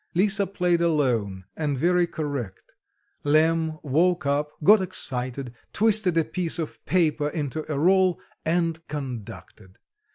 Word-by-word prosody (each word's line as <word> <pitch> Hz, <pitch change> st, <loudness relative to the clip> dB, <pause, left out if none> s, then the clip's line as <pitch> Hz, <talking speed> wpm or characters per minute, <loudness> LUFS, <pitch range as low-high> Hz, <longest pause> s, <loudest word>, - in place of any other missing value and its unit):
Lisa 200 Hz, +2 st, +2 dB
played 180 Hz, -3 st, 0 dB
alone 120 Hz, -, 0 dB
and 145 Hz, -3 st, -2 dB
very 175 Hz, +4 st, +2 dB
correct; 140 Hz, -, -6 dB, 0.5 s
Lemm 160 Hz, +1 st, +2 dB
woke 170 Hz, +4 st, +1 dB
up, 145 Hz, +1 st, 0 dB
got 205 Hz, +4 st, +7 dB
excited, 130 Hz, -8 st, -3 dB, 0.2 s
twisted 215 Hz, -5 st, +3 dB
a 165 Hz, -, +4 dB
piece 175 Hz, -3 st, -2 dB
of 160 Hz, -3 st, -6 dB
paper 155 Hz, -5 st, +1 dB
into 155 Hz, 0 st, -4 dB
a 145 Hz, -, -1 dB
roll, 185 Hz, +3 st, +3 dB, 0.2 s
and 165 Hz, -1 st, -1 dB
conducted. 115 Hz, -7 st, -8 dB
160 Hz, 125 wpm, -25 LUFS, 140-180 Hz, 0.5 s, got